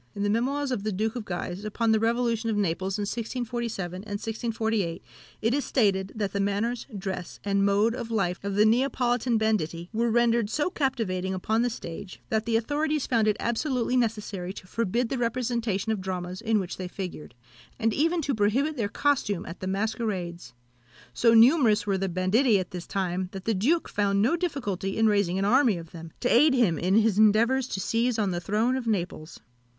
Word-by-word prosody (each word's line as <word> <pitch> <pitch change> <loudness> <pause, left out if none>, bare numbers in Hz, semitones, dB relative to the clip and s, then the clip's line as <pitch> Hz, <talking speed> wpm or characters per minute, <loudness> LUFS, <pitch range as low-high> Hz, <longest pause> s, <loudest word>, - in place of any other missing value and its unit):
In 200 - -2
the 205 - +1
Memoirs 270 +5 0
of 245 - -1
the 215 +1 -2
Duke 215 +4 -1
of 235 -4 -5
Guise 175 +1 -4
upon 220 +2 0
the 220 - +4
Revolution 230 0 0
of 215 - 0
Naples 190 0 -1
in 205 - -2
1647 230 -4 -3
and 205 +2 -7
1648, 220 -4 -2 0.4
it 225 +2 +2
is 285 +1 +1
stated, 195 -6 +1
that 205 -3 -2
the 200 - -1
manners, 205 +4 -1
dress, 190 -2 -5
and 200 -1 +1
mode 205 +3 +3
of 240 -2 -5
life 195 -6 -1
of 200 -1 -3
the 210 +1 +5
Neapolitan 245 0 +2
banditti 175 -6 -1
were 235 +2 +1
rendered 235 -1 +2
so 300 +8 0
captivating 215 - -1
upon 220 +5 0
the 245 - +1
stage, 195 -3 -8
that 220 +1 0
the 230 - +1
authorities 295 +5 0
found 225 -3 +2
it 210 - +2
absolutely 250 0 0
necessary 210 -6 -1
to 190 - -10
forbid 230 +4 -1
the 265 - -2
representation 235 -3 -1
of 215 -3 -2
dramas 185 0 -4
in 225 -1 +1
which 185 -2 -5
they 185 - -4
figured, 180 - -7 0.4
and 225 -1 +1
even 330 +3 +1
to 275 - 0
prohibit 245 +8 +1
their 215 -4 -1
costume 250 -8 0
at 170 - -8
the 185 - -5
masquerades. 190 - -3 0.6
So 230 -1 +4
numerous 235 -2 +5
were 195 -2 0
the 195 0 -1
banditti 200 +7 +3
at 185 -2 -4
this 180 -1 -7
time, 185 -1 -2
that 190 -1 -7
the 225 - +1
duke 275 - +1
found 200 -1 0
no 235 +11 +3
difficulty 240 - -3
in 225 - +3
raising 200 -4 +2
an 195 - 0
army 240 -2 +4
of 165 -1 -10
them, 165 -1 -9
to 245 - +1
aid 270 +4 +5
him 200 - +2
in 185 +3 +1
his 220 -2 +3
endeavours 230 +5 +4
to 195 - -4
seize 230 +4 0
on 205 -3 +1
the 175 -1 -3
throne 220 +8 +1
of 260 -3 -3
Naples. 175 -6 -3
215 Hz, 195 wpm, -27 LUFS, 190-235 Hz, 0.6 s, the